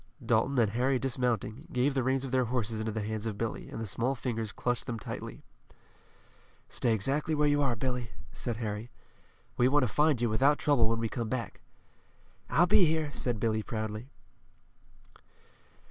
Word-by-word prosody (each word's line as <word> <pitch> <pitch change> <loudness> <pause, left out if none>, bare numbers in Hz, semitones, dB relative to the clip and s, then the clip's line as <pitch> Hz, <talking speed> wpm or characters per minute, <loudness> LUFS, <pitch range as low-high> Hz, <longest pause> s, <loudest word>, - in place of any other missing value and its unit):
Dalton 120 +4 +2
and 110 -4 +3
Harry 130 +4 +2
dismounting, 125 -3 -1
gave 130 +3 +2
the 135 - +1
reins 130 +1 +1
of 130 - -6
their 130 -1 +3
horses 115 -2 -1
into 110 0 -2
the 110 0 -3
hands 110 +1 -3
of 105 -2 -3
Billy, 115 0 -3
and - - -6
the 115 - -3
small 120 +6 -1
fingers 115 -4 -3
clutched 125 +3 -1
them 115 - -2
tightly. - - -7 1.2
"Stay 120 - 0
exactly 140 +9 0
where 150 0 +3
you 145 0 +3
are, 135 -4 +2
Billy," 125 0 -2 0.2
said 120 -3 -3
Harry. 110 0 -4 0.7
"We 125 - +5
want 145 +1 +4
to - - +2
find 150 +2 +3
you 120 - +2
without 135 +7 +3
trouble 125 -7 +3
when 115 - +1
we 115 0 -1
come 115 0 -3
back." 130 -1 -4 0.9
"I'll 165 +8 +5
be 180 +1 +6
here," 155 -2 0
said 120 -4 -2
Billy 110 -1 +1
proudly. 110 +2 -4
120 Hz, 175 wpm, -30 LUFS, 110-135 Hz, 1.2 s, be